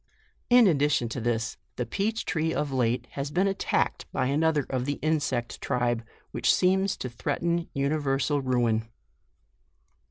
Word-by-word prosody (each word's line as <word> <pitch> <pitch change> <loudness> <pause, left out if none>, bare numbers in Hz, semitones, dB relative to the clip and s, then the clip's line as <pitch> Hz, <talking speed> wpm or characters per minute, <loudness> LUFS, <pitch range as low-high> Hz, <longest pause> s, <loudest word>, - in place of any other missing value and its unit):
In 245 -1 +7
addition 145 - +2
to 120 - -4
this, 115 -1 -1 0.2
the 125 - -2
peach 215 - -2
tree 160 0 0
of 145 -2 -1
late 125 -2 0
has 140 0 -4
been 180 +6 +1
attacked 195 -1 -1
by - - 0
another 150 +1 +2
of 130 -1 -2
the 145 0 -2
insect 145 -6 -1
tribe, 120 -2 0 0.3
which - - +2
seems 190 +1 +2
to - - -4
threaten 170 +7 -2
universal 140 0 0
ruin. 120 -4 +1
140 Hz, 140 wpm, -27 LUFS, 125-160 Hz, 0.3 s, In